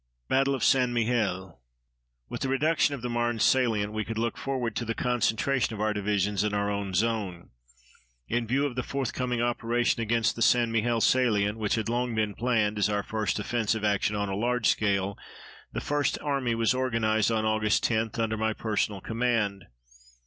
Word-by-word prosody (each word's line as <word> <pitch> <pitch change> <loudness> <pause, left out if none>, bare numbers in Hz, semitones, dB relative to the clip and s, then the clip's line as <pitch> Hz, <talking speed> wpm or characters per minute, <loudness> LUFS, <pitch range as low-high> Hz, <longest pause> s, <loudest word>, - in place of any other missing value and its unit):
BATTLE 135 +1 +2
OF 130 - -4
ST. 130 -2 +4
MIHIEL 105 - -1 0.7
With - - -6
the 135 - -1
reduction 145 +2 +2
of 125 - -10
the 125 - -2
Marne 120 0 0
salient, 110 -4 +2
we 110 0 -1
could 115 +1 -5
look 115 0 -1
forward 125 -5 -3
to - - -1
the 115 0 -3
concentration 125 +1 0
of - - -8
our 110 0 +1
divisions 105 -1 0
in 105 -1 -1
our 100 0 0
own 100 -2 -3
zone. 100 -4 -1 0.8
In 120 - -1
view 135 +5 +1
of 135 -4 -3
the 125 - -1
forthcoming 125 -2 -2
operation 120 0 0
against 115 0 +1
the 115 - -7
St. 120 0 +4
Mihiel 115 +1 +1
salient, 110 -4 +2
which 105 -2 0
had 110 -1 -2
long 120 0 -1
been 105 -2 0
planned 110 -2 0
as 105 - +2
our 105 -1 0
first 110 -1 -2
offensive 110 0 -1
action 105 0 +1
on 100 0 -1
a 95 - -3
large 120 +2 0
scale, 100 -2 +1 0.5
the - - -4
First 145 0 0
Army 135 -5 -1
was 115 0 +2
organized 115 -4 +1
on 110 -1 0
Aug. 110 0 +2
10 110 -1 0
under 110 -1 -1
my 110 0 0
personal 105 -3 -2
command. 115 -5 -1
115 Hz, 185 wpm, -27 LUFS, 105-120 Hz, 0.8 s, ST